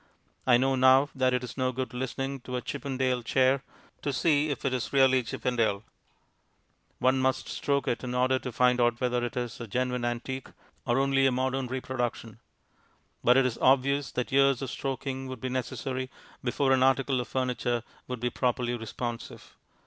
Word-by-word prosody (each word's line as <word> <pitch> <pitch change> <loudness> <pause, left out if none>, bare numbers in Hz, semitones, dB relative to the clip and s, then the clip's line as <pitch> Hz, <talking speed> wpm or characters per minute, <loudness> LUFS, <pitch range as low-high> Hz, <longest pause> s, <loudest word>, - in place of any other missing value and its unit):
I 120 -2 +7
know 135 +2 +2
now 130 +2 +5
that 130 -1 +2
it 125 0 0
is 125 +1 -7
no 130 0 +1
good 130 -1 -4
listening 135 +2 -3
to 125 0 -6
a 125 - -1
Chippendale 130 -3 -1
chair 130 +3 +2 0.4
to 145 - -1
see 150 +2 +2
if 140 - -4
it 135 - +1
is 125 -2 -2
really 130 -1 +5
Chippendale; 115 -4 -1 1.1
one 130 +1 +2
must 130 0 0
stroke 140 -1 -1
it 120 - -1
in 125 0 -3
order 130 +1 +2
to 125 - -5
find 125 +1 +3
out 120 0 +2
whether 125 -1 0
it 120 - -4
is 120 -2 -3
a 115 - -5
"genuine 125 +3 -1
antique" 120 +2 -3 0.4
or 120 +1 +2
only 135 0 +3
a - - +3
modern 130 +1 -1
reproduction; 120 -3 -4 0.8
but 125 +2 +5
it 135 - +4
is 125 -2 -2
obvious 140 +2 +3
that 125 - -2
years 135 -1 +3
of 130 - -4
stroking 135 0 -4
would 130 -1 -6
be 130 - -3
necessary 130 0 -3 0.3
before 135 +2 +1
an 130 -1 +4
article 135 0 +3
of 120 - -7
furniture 125 -2 -1 0.2
would 125 -1 -4
be 125 +1 -1
properly 125 -1 0
responsive. 120 +1 -6
130 Hz, 180 wpm, -28 LUFS, 125-135 Hz, 1.1 s, I